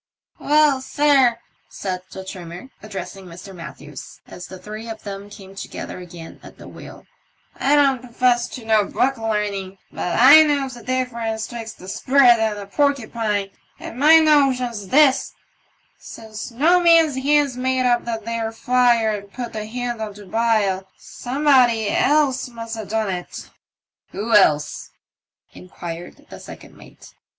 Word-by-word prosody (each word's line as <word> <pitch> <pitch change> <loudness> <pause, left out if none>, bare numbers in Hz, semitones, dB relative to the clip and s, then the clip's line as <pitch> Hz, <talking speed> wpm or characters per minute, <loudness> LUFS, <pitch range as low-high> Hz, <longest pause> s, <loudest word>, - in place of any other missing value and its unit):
"Well, 295 -2 +3
sir," 270 -4 +3 0.3
said 185 -2 -5
the 190 - -9
trimther, 180 +6 -9
addressing 195 -2 -8
Mr. 180 +3 -11
Matthews, 150 -5 -11
as 180 - -10
the 190 - -10
three 215 +4 -9
of 220 -1 -8
them 200 0 -8
came 195 -1 -13
together 195 - -8
again 170 -2 -11
at - - -14
the - - -12
wheel, - - -12 0.5
"I 280 +2 +2
don't 275 -4 +3
profess 245 -1 0
to 240 - -10
no 220 -1 +3
book 265 +3 -1
learning, 205 -3 -3
but 180 - -3
i 280 +6 +9
knows 285 -4 0
the 240 - -11
difference 235 -3 -3
twixt 225 -2 -8
a 185 - -11
sprat 250 +3 +4
and 220 -1 -1
a 200 - -7
porcupine, 220 -5 -1 0.3
and 240 - -9
my 310 +3 +7
notion's 260 -9 +2
this: 270 +3 +3 0.7
since 220 +1 -9
no 310 +10 +3
man's 330 -5 +4
hands 285 -1 +2
made 255 0 -1
up 240 -1 +2
that 225 -2 -5
there 230 -1 -3
fire 240 -1 +2
and 200 -1 -7
put 240 0 -7
the 215 -1 -5
hen 240 0 -4
on 210 -2 -5
to 205 0 -12
bile, 205 -2 0
somebody 250 -5 +1
else 285 -4 +1
must 230 -1 -7
ha' 220 -3 -7
done 220 -2 -1
it." 180 -1 -7 0.3
" - - -48
Who 220 +4 -3
else? 150 -7 +2 0.3
" - - -42
inquired 175 -1 -10
the - - -10
second - - -13
mate. - - -17
230 Hz, 155 wpm, -21 LUFS, 200-260 Hz, 0.7 s, i